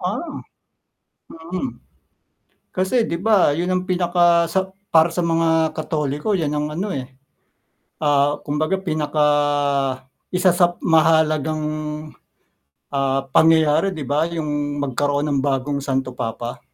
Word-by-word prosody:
Ah. - - -2 1.1
Mm. 175 +9 -6 0.9
Kasi 190 +6 +1
'di 170 -5 -3
ba 205 -7 +4
'yon 170 +5 -1
ang 185 0 0
pinaka 175 -2 +2
sa 190 +1 -1 0.2
para 165 +1 +4
sa 175 - -4
mga 165 -2 +1
Katoliko 150 +4 -2
'yan 155 -6 0
ang 150 0 -1
ano, 185 +7 -3
eh. 130 0 -6 0.9
Ah, 145 0 +3
kumbaga 155 +6 -1
pinaka 155 -3 -1 1.1
isa 185 +1 +4
sa 175 0 +2
mahahalagang, 155 -1 +2 1.3
ah, 135 -1 0
pangyayari, 160 +2 +4
'di 150 - -5
ba, 150 +5 0
'yong 145 -3 -3
magkaroon 145 +2 -1
ng 140 - +1
bagong 140 +1 -1
Santo 135 -2 -2
Papa. 120 +1 -5
155 Hz, 120 wpm, -21 LUFS, 145-175 Hz, 1.3 s, ba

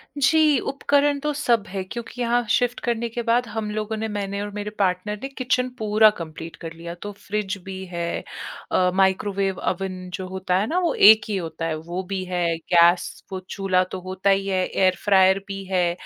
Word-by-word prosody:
जी, 300 0 +4
उपकरण 285 +2 +1
तो 300 +1 -1
सब 240 -7 +1
है, 190 0 -4
क्योंकि 235 +5 -7
यहाँ 240 0 +2
शिफ्ट 245 +1 +1
करने 235 -1 0
के 235 +1 -4
बाद 235 +1 +2
हम 215 -1 -4
लोगों 215 +1 -3
ने, 220 - -2
मैंने 200 -1 -3
और 205 - -4
मेरे 205 0 -4
पार्टनर 195 +2 0
ने - - -2
किचन 255 -1 0
पूरा 215 0 +5
कम्प्लीट 165 0 -7
कर 165 0 -8
लिया। 170 +1 -7
तो 205 - -5
फ्रिज 205 0 -4
भी 190 0 -6
है 170 -1 -3 0.5
अ, 180 0 +3
माइक्रोवेव, 195 0 +1
ओवन 185 0 -3
जो 185 +1 -4
होता 185 -1 -2
है 205 +3 0
ना 355 +3 +1
वो 345 -2 +1
एक 215 +2 +8
ही 205 - 0
होता 165 -1 -4
है, 160 -1 -1
वो 170 +4 -5
भी 190 0 -3
है, 180 -1 -1 0.3
गैस, 170 +1 +4
वो 190 - -3
चूल्हा 190 -2 +1
तो 190 - -4
होता 185 +2 -1
ही 195 0 +2
है, 185 -1 +1
एयर 185 -1 +2
फ्रायर 190 -1 +5
भी 195 0 -5
है 180 -2 +1
195 Hz, 200 wpm, -23 LUFS, 185-225 Hz, 0.5 s, एक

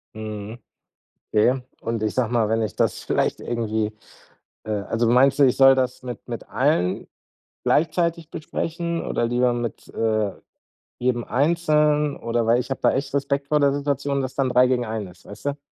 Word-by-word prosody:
Mhm, 110 +1 -6 0.7
okay. 125 +5 +3 0.2
Und, 115 -1 -3
ich 110 - 0
sage 120 -3 0
mal, 115 -3 +2
wenn 115 0 +1
ich 110 - -3
das - - 0
vielleicht - - 0
irgendwie, 110 -2 -2 0.7
äh 110 - -6
also, 110 +3 -1
meinst 130 +4 +4
du, 145 - +6
ich 125 - +2
soll 135 0 +7
das 130 -1 -1
mit 125 -4 -7
mit - - -6
allen 90 +1 +1 0.6
gleichzeitig 170 0 +1
besprechen 170 +2 -3
oder - - 0
lieber 120 +1 +2
mit, 120 -1 -5
äh, 110 -2 0 0.7
jedem 120 -1 0
einzeln 150 0 +2
oder 115 0 -1
weil 120 +2 +4
ich 120 - -6
habe 135 - -3
da - - +4
echt 140 +1 -3
Respekt 140 0 -1
vor 150 -1 +2
der 140 -1 +4
Situation, 140 0 -1
dass 130 -1 -4
dann 135 -2 0
3 125 +1 +5
gegen 125 -1 +1
einen 110 -2 -4
ist, 90 0 -16
weißt 105 +7 -11
du? 145 0 -1
125 Hz, 180 wpm, -23 LUFS, 115-140 Hz, 0.7 s, soll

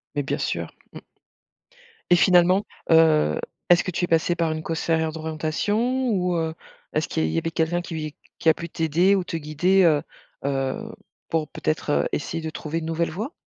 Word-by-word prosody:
Mais 145 - 0
bien - - -2
sûr. - - -3 0.2
Mmh. - - -8 1.1
Et 175 - +8
finalement, 180 +2 +4 0.3
heu, 160 - +5 0.3
est-ce 175 0 +6
que 185 - -3
tu 175 +1 0
es - - -10
passée 165 +1 +2
par 165 -2 0
une 155 0 -3
conseillère 160 0 0
d'orientation 165 +11 -1
ou, 180 -4 +1
heu, 160 -1 -1 0.4
est-ce - - 0
qu'il 80 - -1
y - - +2
a 80 - 0
il - - -4
y - - 0
avait 165 - -3
quelqu'un 165 +2 0
qui 165 -1 -7
v 155 -1 -5 0.2
qui 160 - +3
a - - +7
pu 170 +2 -7
t'aider 165 +5 +2
ou 190 - 0
te 165 - -4
guider, 175 +5 +2
heu, 155 -4 +4 0.4
heu, 135 -1 -1 0.5
pour, 160 -2 0
peut-être, 155 -1 -2
heu, - - 0
essayer 165 +2 -3
de 160 - -3
trouver 155 +1 -4
une 160 - -6
nouvelle 165 +1 -1
voie? 220 - -4
165 Hz, 205 wpm, -24 LUFS, 155-175 Hz, 1.1 s, Et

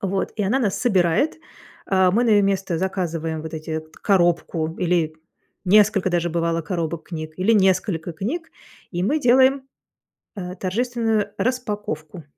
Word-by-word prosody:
Вот. 195 0 -1
И 210 - 0
она 240 +8 +2
нас 205 -5 0
собирает, 190 - +2 0.5
а, 190 -2 +3
мы 235 +4 +3
на - - +1
ее 205 -1 +5
место 195 -3 0
заказываем 165 -4 -2
вот 160 0 -7
эти 160 0 -4
т 155 - -17 0.2
коробку 170 -4 +1
или 170 -3 +1 0.5
несколько 200 -1 +4
даже, 175 -1 0
бывало, 165 0 0
коробок 165 -2 -4
книг 155 -2 -6
или 185 +4 +1
несколько 185 -4 +2
книг, 290 - -4 0.4
и 175 - -2
мы 300 +9 +1
делаем, 260 +2 +4 0.7
э, 180 -2 -5
торжественную 225 +1 -1
распаковку. 205 -10 -3
185 Hz, 145 wpm, -22 LUFS, 165-210 Hz, 0.7 s, ее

